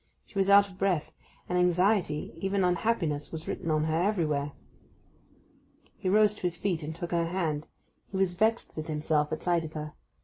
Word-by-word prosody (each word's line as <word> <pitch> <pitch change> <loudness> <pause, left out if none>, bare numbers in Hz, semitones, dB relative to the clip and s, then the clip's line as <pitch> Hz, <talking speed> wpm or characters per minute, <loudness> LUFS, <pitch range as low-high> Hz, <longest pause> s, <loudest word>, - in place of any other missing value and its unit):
She 200 - -5
was 195 0 +2
out 200 0 +7
of 185 -1 -16
breath; 175 -6 0 0.4
and 180 0 +1
anxiety, 180 -3 +2
even 195 +2 0
unhappiness 175 -5 0
was 160 0 -7
written 165 - -3
on 155 -1 +2
her 160 +1 +1
everywhere. 155 -8 0 1.5
He 185 - -1
rose 210 +1 +5
to - - -13
his 175 -1 -1
feet, 180 -4 -1
and 155 +1 -5
took 170 +1 -5
her 170 -1 +1
hand. 160 -4 -2 0.4
He 195 - -4
was 190 -2 +2
vexed 220 +5 +1
with 155 0 -5
himself 150 -1 0
at 155 - -3
sight 175 -2 +2
of 155 -1 -7
her. 150 -1 -5
175 Hz, 190 wpm, -29 LUFS, 155-195 Hz, 1.5 s, out